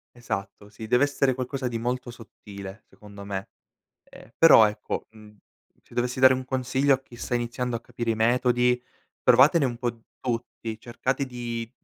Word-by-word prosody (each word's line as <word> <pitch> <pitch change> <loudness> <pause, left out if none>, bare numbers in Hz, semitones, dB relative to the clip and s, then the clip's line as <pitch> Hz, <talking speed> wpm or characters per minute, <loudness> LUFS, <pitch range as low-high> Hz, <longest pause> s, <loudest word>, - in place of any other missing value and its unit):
Esatto. 100 -3 -6
Sì, 105 +2 -9
deve 125 +5 +4
essere 140 -2 +1
qualcosa 130 +1 -3
di 115 -2 -3
molto 125 +1 -3
sottile 100 -3 -11
secondo 100 -1 -13
me. 100 -1 -5 0.6
Ehm, - - -15
però 145 -9 +8
ecco, 105 0 -5
mhmm, 105 -1 -16 0.5
se - - -19
dovessi 125 +1 -1
dare 130 0 +7
un 130 0 -4
consiglio 130 +2 +1
a 130 - -3
chi 130 - -17
sta 120 +1 -2
iniziando 120 +1 -2
a - - -7
capire 120 0 -4
i 110 - 0
metodi, 125 +1 +2 0.4
provatene 140 +5 +6
un 120 -3 -2
po' 120 -2 -3 0.2
tutti 115 -2 -4
cercate 130 +4 -2
di 120 -2 -5
120 Hz, 165 wpm, -26 LUFS, 110-130 Hz, 0.6 s, però